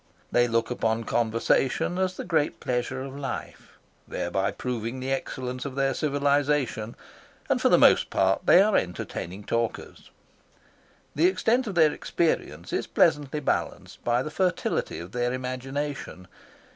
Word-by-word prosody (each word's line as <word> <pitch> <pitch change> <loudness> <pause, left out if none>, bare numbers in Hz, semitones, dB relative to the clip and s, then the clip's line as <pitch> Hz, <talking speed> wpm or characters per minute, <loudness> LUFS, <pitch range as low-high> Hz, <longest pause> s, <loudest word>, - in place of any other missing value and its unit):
They 120 0 +4
look 115 0 0
upon 115 -1 0
conversation 120 +9 +1
as 185 0 0
the - - -4
great 160 -4 0
pleasure 125 +1 -2
of 135 0 -8
life, 140 -1 -7 0.3
thereby - - -1
proving 125 0 -4
the 130 +1 -3
excellence 130 -1 -3
of 140 -2 -6
their 135 -1 +1
civilisation, 140 -5 0 0.5
and - - +1
for - - +4
the - - +6
most - - +5
part 95 0 +1
they 185 - +8
are 215 0 +2
entertaining 90 +2 -3
talkers. 115 +2 -3 1.0
The 160 +4 +4
extent 225 +7 +1
of 200 - -4
their 160 -3 +5
experience 85 - -2
is - - -1
pleasantly 150 +1 +2
balanced - - -3
by 120 +1 +1
the 155 - -5
fertility 185 +2 -1
of 85 +2 -8
their 120 +1 -1
imagination. 130 -5 -4
130 Hz, 145 wpm, -26 LUFS, 115-150 Hz, 1.0 s, they